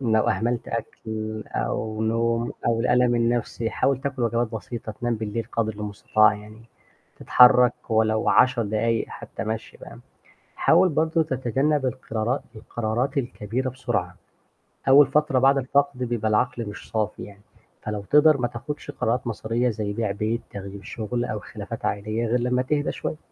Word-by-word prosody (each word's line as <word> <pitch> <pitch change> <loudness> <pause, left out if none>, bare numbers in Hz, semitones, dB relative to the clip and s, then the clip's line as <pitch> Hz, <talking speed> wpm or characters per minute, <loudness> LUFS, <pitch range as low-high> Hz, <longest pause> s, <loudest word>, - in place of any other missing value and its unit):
لو 110 -4 +2
أهملت 115 +4 -1
أكْل، 110 -1 -5
أو 110 0 -2
نوم، 115 +1 0
أو 115 -1 +2
الألم 125 0 +3
النَفْسي 115 -1 0
حاول 135 -1 +1
تاكل 135 -2 -3
وجبات 115 0 0
بسيطة، 110 0 -6
تنام 120 +2 -2
بالليل 110 +1 -3
قدْر 110 -1 0
المستطاع 105 +1 +2
يعني، 105 +2 -12 0.6
تتحرك 125 -1 +6 0.2
ولو 110 0 +2
10 125 -1 +4
دقايق 110 +2 0
حتى - - -7
مَشي 110 0 -5
فاهم؟ - - -11 0.6
حاول 185 - +4
برضه 160 +1 +1
تتجنب 135 +1 0
القِرارات، 115 +1 -2
القَرارات 120 +5 -2
الكبيرة 125 0 -2
بسرعة. 130 0 -3 0.7
أول 140 +1 +8
فترة 140 -1 +2
بعد 135 +2 +4
الفقد 140 +1 +1
بيبقى 120 -3 -1
العقل 120 +2 0
مش 105 - -10
صافي 110 -1 -2
يعني، 100 0 -14 0.4
فلو 105 -1 -4
تقدَر 150 0 +6
ما 120 - 0
تاخدش 145 +6 -6
قرارات 120 +3 -1
مصيرية 115 +2 -1
زَي 105 -1 -3
بيع 110 0 -1
بيت، 110 +3 -1
تغيير 100 0 -8
شغل، 120 +3 -3
أو 110 - -3
خلافات - - -8
عائلية 110 +3 -1
غِير 120 +2 +1
لمّا 125 +1 +1
تهدا 145 +3 0
شوية. 155 - -4
115 Hz, 150 wpm, -24 LUFS, 110-125 Hz, 0.7 s, أول